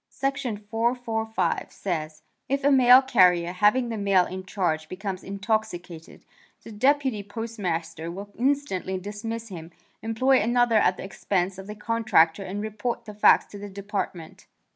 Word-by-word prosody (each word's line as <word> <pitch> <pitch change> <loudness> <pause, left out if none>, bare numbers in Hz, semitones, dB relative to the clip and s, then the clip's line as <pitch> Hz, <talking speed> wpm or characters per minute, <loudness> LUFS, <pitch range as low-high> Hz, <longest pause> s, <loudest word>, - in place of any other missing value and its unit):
Section 275 -5 -2
445 225 +1 -2
says: 155 -4 -4 0.3
"If 275 +1 0
a 285 - +4
mail 255 0 +7
carrier 180 -9 +4
having 210 +7 +2
the 225 -2 -4
mail 195 -3 +3
in 185 +1 -6
charge 160 -6 -1
becomes 190 0 -5
intoxicated, 195 -5 -4 0.4
the - - -10
Deputy 260 0 +1
Postmaster 185 -7 -4
will 200 +4 -8
instantly 255 -8 -1
dismiss 220 +4 -6
him, 165 -3 -8 0.3
employ 255 +4 +2
another 240 +1 +3
at 190 -3 +3
the - - -7
expense 190 -1 -2
of 190 - -9
the 210 - -7
contractor 210 -7 +2
and 195 +2 -5
report 220 +2 -4
the 210 - -8
facts 210 - +5
to 205 - -9
the 205 0 -7
Department." 195 -4 -6
205 Hz, 145 wpm, -25 LUFS, 185-230 Hz, 0.4 s, mail